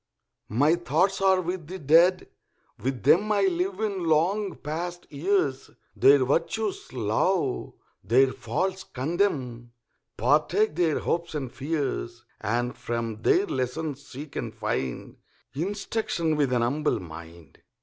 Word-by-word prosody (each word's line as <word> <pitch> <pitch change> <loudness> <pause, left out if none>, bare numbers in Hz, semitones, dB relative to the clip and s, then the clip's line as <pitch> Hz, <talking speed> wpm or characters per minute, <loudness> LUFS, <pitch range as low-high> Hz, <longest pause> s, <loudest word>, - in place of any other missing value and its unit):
My 145 +9 +3
thoughts 190 +3 +1
are 190 -1 +4
with 175 -2 -4
the 185 +3 -6
Dead, 170 +4 +4 0.5
with 130 -3 -3
them 190 - +4
I 205 -1 +3
live 185 +1 0
in 200 -5 -2
long 180 +6 +1
past 175 +4 -5
years, 145 -3 0 0.3
Their 135 -1 +6
virtues 185 - -1
love, 130 - 0 0.3
their 130 +2 +4
faults 185 +13 -2
condemn, 130 -6 -2 0.4
Partake 430 +1 +2
their 165 -4 +2
hopes 170 -1 -2
and 135 -5 -3
fears, 135 -5 -3
And 120 +3 -1
from 115 -2 -4
their 195 - +3
lessons 140 +1 -3
seek 140 +3 -10
and - - -4
find 65 -2 -3 0.4
Instruction 175 -1 -1
with 145 -3 +2
^n 125 -1 +1
humble 145 +6 0
mind. 80 -2 -12
150 Hz, 125 wpm, -26 LUFS, 125-185 Hz, 0.5 s, Their